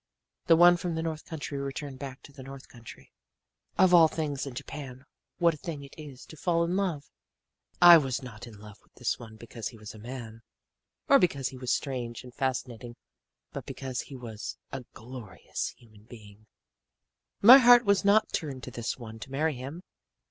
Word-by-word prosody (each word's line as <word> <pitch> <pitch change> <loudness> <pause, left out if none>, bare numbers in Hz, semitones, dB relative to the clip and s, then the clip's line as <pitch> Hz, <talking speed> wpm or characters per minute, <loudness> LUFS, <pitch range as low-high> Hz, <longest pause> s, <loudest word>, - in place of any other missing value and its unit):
"The 165 - +7
one 175 +1 +7
from 175 -1 -3
the 160 - -2
north 160 -2 -4
country 145 -3 -5
returned 140 0 -6
back 135 -2 -8
to - - -14
the 135 - -11
north 135 0 -10
country. 120 -2 -14 0.7
"Of 185 -1 +5
all 165 -2 +8
things 145 -3 -3
in 130 - -8
Japan, 130 -1 -8 0.3
what 170 -2 +3
a - - -9
thing 150 -2 -6
it 140 - -13
is 145 -5 -11
to - - -13
fall 170 +2 +1
in 170 +2 -1
love! 175 -8 -2 0.7
"I 175 -1 +10
was 135 -2 -3
not 120 -2 -10
in 110 -3 -12
love 105 0 -13
with - - -33
this 125 - -2
one 110 -2 -11
because 115 0 -7
he 115 - -10
was 105 -1 -10
a 110 - -12
man, 115 -1 -8 0.7
or 275 - +7
because 140 -7 +1
he 130 - -11
was 125 -1 -2
strange 125 -5 -3
and 125 -1 -12
fascinating 125 -3 -3 0.6
but - - -7
because 130 -2 -4
he 140 - -11
was 115 -4 -7
a 135 -2 -6
glorious 110 -6 -7
human 110 -3 -20
being. 110 -2 -15 1.0
"My 250 +6 +11
heart 245 -1 +7
was 200 0 +3
not 205 +2 +3
turned 140 -6 -4
to 125 - -7
this 115 0 -4
one 115 -3 -10
to 130 - -10
marry 155 +3 0
him. 140 +7 -8
135 Hz, 190 wpm, -28 LUFS, 120-160 Hz, 1.0 s, My